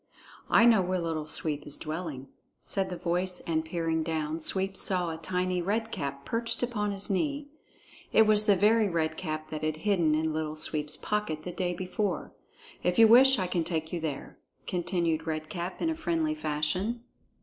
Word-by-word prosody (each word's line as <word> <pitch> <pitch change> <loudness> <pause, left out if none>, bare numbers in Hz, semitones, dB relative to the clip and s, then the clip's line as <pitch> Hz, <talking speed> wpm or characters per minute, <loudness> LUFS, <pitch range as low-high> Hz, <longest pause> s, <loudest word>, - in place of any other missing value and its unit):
"I 230 - +6
know 225 -4 +6
where 185 0 0
Little 160 -2 -3
Sweep 150 -1 -2
is 145 - -2
dwelling," 155 -4 -5 0.3
said 195 -1 -2
the 180 - -5
voice, 180 +1 -1
and 160 -1 -1
peering 165 0 -1
down, 160 0 -2
Sweep 190 +4 -1
saw 180 -3 +3
a 160 - -5
tiny 180 +2 -1
Red 220 +5 -1
Cap 140 0 -4
perched 230 +1 -1
upon 210 -4 -1
his 200 0 -2
knee. 285 +8 -1 0.6
(It 220 - +6
was 215 0 +4
the 205 -2 +5
very 210 +2 +4
Red 160 -2 0
Cap 155 -3 -5
that 155 - -4
had 155 0 -1
hidden 175 -7 +3
in 160 0 0
Little 155 0 -2
Sweep's 150 -1 -1
pocket 210 -8 -2
the 180 - -5
day 175 0 -2
before.) 185 0 -3 0.5
"If 180 - 0
you 225 -1 +8
wish, 265 +4 +7
I 185 - 0
can 175 -2 0
take 160 -1 -3
you 175 - -1
there," 155 -4 -5 0.3
continued 170 -3 -1
Red 155 -1 -3
Cap 175 0 -4
in 330 - +2
a - - -2
friendly 320 -1 0
fashion. 185 - -1
175 Hz, 185 wpm, -29 LUFS, 155-205 Hz, 0.6 s, you